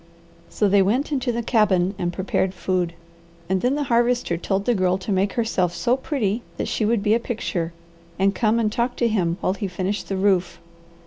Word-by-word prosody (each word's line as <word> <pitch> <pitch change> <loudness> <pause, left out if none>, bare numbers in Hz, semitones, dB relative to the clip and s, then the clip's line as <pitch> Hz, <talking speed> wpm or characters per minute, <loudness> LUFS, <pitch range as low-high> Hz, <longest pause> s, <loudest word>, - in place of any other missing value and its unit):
So 210 - +1
they 200 0 +4
went 245 +11 +1
into 260 -3 0
the 235 0 -2
cabin 195 -5 +2
and 175 -1 -1
prepared 190 0 -1
food, 180 -2 -1 0.5
and 190 0 0
then 255 +3 +1
the 295 - 0
Harvester 240 -6 +1
told 195 +3 -2
the 245 - +3
Girl 185 -3 +2
to 190 +2 -5
make 195 +1 +1
herself 185 -7 0
so 245 +5 +2
pretty 245 -6 -1 0.2
that - - -2
she 220 - 0
would 220 -1 +1
be 210 0 +3
a 230 - +3
picture 195 -8 -3 0.5
and 195 +1 +2
come 220 0 +2
and 220 -2 +1
talk 240 +2 -1
to 235 - +1
him 180 -6 0
while 185 - +1
he 200 0 -3
finished 190 +3 -3
the 195 - -1
roof. 190 -2 +1
205 Hz, 205 wpm, -23 LUFS, 185-235 Hz, 0.5 s, they